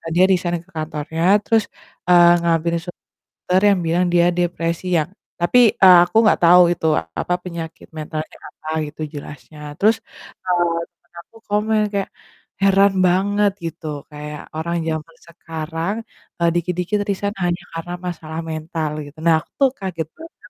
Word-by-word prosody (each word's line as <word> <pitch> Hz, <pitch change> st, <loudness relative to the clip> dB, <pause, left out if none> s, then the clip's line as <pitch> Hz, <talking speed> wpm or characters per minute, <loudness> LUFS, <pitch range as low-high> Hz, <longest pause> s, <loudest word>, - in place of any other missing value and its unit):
dia 180 Hz, -, +5 dB
resign 175 Hz, -2 st, 0 dB
ke -, -, -27 dB
kantornya 155 Hz, +1 st, -4 dB, 0.2 s
terus, 225 Hz, -2 st, +2 dB, 0.4 s
eee, 175 Hz, -1 st, +7 dB
ngambil 170 Hz, 0 st, +1 dB
surat 175 Hz, 0 st, -10 dB, 0.3 s
dokter 185 Hz, +1 st, 0 dB
yang 195 Hz, -, +2 dB
bilang 175 Hz, +2 st, +2 dB
dia 175 Hz, 0 st, +5 dB
depresi 170 Hz, 0 st, -2 dB
yang 150 Hz, -, -1 dB, 0.3 s
tapi, 245 Hz, +8 st, +4 dB, 0.2 s
eee, 185 Hz, -2 st, +8 dB
aku 220 Hz, -, -2 dB
nggak 215 Hz, -, +4 dB
tau 180 Hz, +1 st, +8 dB
itu 160 Hz, -1 st, -3 dB, 0.3 s
apa 180 Hz, -, -1 dB
penyakit 165 Hz, -2 st, -7 dB
mentalnya 155 Hz, 0 st, -6 dB
apa 155 Hz, -, -11 dB, 0.2 s
gitu 150 Hz, -, -11 dB
jelasnya, 150 Hz, +1 st, -10 dB, 0.2 s
terus, 220 Hz, +2 st, +4 dB, 0.5 s
eee, 175 Hz, -2 st, +1 dB
temen 175 Hz, 0 st, -43 dB
aku 225 Hz, -, -21 dB
komen 215 Hz, +1 st, +1 dB
kayak, 200 Hz, -1 st, -1 dB, 0.5 s
"Heran 195 Hz, 0 st, +4 dB
banget," 200 Hz, +3 st, +2 dB
gitu, 165 Hz, -1 st, -6 dB, 0.2 s
kayak, 150 Hz, 0 st, -7 dB, 0.2 s
"orang 170 Hz, +2 st, -2 dB
zaman 160 Hz, +1 st, -5 dB
sekarang, 165 Hz, +3 st, -5 dB, 0.5 s
eee, 170 Hz, -, +4 dB
dikit-dikit 180 Hz, +4 st, -1 dB
resign 200 Hz, 0 st, -2 dB
hanya 175 Hz, +1 st, -1 dB
karena 165 Hz, +2 st, -5 dB
masalah 160 Hz, -2 st, -6 dB
mental," 155 Hz, -1 st, -3 dB
gitu. 145 Hz, +2 st, -14 dB
Nah 165 Hz, -1 st, +6 dB
aku -, -, -23 dB
tuh 275 Hz, -, +5 dB
kaget 175 Hz, -5 st, -4 dB
banget 330 Hz, 0 st, -12 dB
175 Hz, 150 wpm, -20 LUFS, 160-190 Hz, 0.5 s, eee